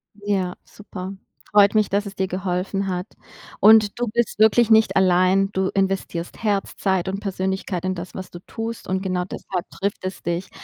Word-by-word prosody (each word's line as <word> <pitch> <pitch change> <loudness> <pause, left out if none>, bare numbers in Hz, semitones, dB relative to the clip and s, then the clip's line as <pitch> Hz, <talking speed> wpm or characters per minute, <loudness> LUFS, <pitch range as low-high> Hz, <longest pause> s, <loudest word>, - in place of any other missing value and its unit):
Ja, 195 -3 -1
super. 195 -2 -8 0.4
Freut 205 0 +6
mich, 215 -1 +3
dass 205 +1 0
es 200 - -7
dir 190 -1 -1
geholfen 190 +1 -2
hat. 180 0 -2 0.5
Und 215 0 +6
du 245 - 0
bist 235 0 -1
wirklich 220 +2 +5
nicht 220 0 +5
allein, 190 +1 +3
du 190 -1 0
investierst 195 -3 -2
Herz, 200 -2 0
Zeit 190 -2 0
und 195 - -2
Persönlichkeit 190 -2 -3
in 185 -1 -1
das, 175 +1 -7
was 185 -1 -7
du 175 - -9
tust 225 0 -5
und 190 +1 -1
genau 185 -2 -1
deshalb 180 -1 -5
trifft 200 -1 -3
es 185 0 -5
dich. 175 +2 -2
195 Hz, 180 wpm, -22 LUFS, 185-205 Hz, 0.5 s, Freut